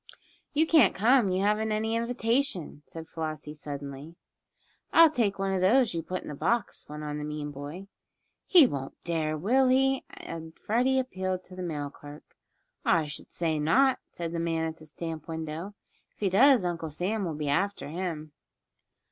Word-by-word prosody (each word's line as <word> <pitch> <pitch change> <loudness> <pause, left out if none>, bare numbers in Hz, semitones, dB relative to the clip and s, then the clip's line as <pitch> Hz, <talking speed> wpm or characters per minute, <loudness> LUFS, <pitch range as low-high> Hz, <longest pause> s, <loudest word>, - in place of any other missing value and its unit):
"You 310 +2 +3
can't 320 -1 +5
come 230 +1 +4
you 185 +1 0
haven't 215 +2 +1
any 220 +1 0
invitation," 235 - -1
said 160 -1 -9
Flossie, 155 -2 -5
suddenly. 145 +1 -7 0.8
"I'll 330 -2 +7
take 225 -8 0
one 195 0 -1
of 185 - 0
those 230 +4 +4
you 165 - -2
put 185 +3 -5
in - - -8
the - - -5
box," 200 +11 -1
went 150 0 -7
on 150 0 -4
the - - -4
mean 150 0 -4
boy. 145 +7 -7 0.6
"He 345 -6 +8
won't 135 - -4
dare 160 -2 -1
will 250 - +3
he?" 270 +1 +3
and 160 -1 -9
Freddie 250 +5 +1
appealed 185 -8 -2
to 185 - -12
the 185 - -6
mail 150 -5 -3
clerk. 145 +1 -12 0.6
"I 165 -2 +3
should 150 +1 -7
say 160 -3 -1
not!" 260 - +3
said 170 -1 -5
the 170 - -3
man 165 -1 0
at 160 0 -4
the 155 -2 -14
stamp 160 0 -6
window. 160 +4 -5 0.4
"If - - -38
he 200 - +2
does 250 0 +6
Uncle 165 -2 -2
Sam 195 +8 -2
will 165 -4 -3
be 150 0 -3
after 200 +6 0
him." 160 -2 -4
175 Hz, 180 wpm, -28 LUFS, 155-220 Hz, 0.8 s, He